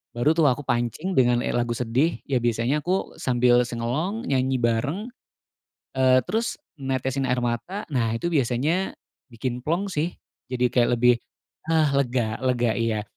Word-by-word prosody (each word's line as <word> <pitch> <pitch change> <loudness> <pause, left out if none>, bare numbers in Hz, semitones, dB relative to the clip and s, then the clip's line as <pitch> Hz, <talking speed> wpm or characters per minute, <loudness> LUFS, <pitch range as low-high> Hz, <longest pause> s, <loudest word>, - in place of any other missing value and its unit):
baru 120 +6 +3
tuh 160 -2 +3
aku 135 +3 -1
pancing 120 - -1
dengan 120 -3 +3
e - - 0
lagu 120 -1 0
sedih 125 +8 0
ya 130 -4 +1
biasanya 120 +5 +1
aku 185 +4 -1
sambil 125 -1 +4
sing 115 -1 -5
along 170 - -2
nyanyi 130 -1 +1
bareng, 130 - -1 0.9
eee, 130 -1 +5
terus 230 +2 -1 0.2
netesin 130 0 -1
air 125 0 +1
mata 120 - -3
nah 115 -4 +1
itu 170 +9 -2
biasanya, 145 +7 +1 0.4
bikin 125 +2 -4
plong 175 +6 0
sih 170 -1 -1 0.4
jadi 125 -1 +1
kayak 120 -1 +3
lebih, 125 0 +6 0.6
ah, 160 -2 +3
lega 120 -4 0
lega, 120 -2 +2
iya, 115 -2 0
130 Hz, 155 wpm, -24 LUFS, 120-155 Hz, 0.9 s, lebih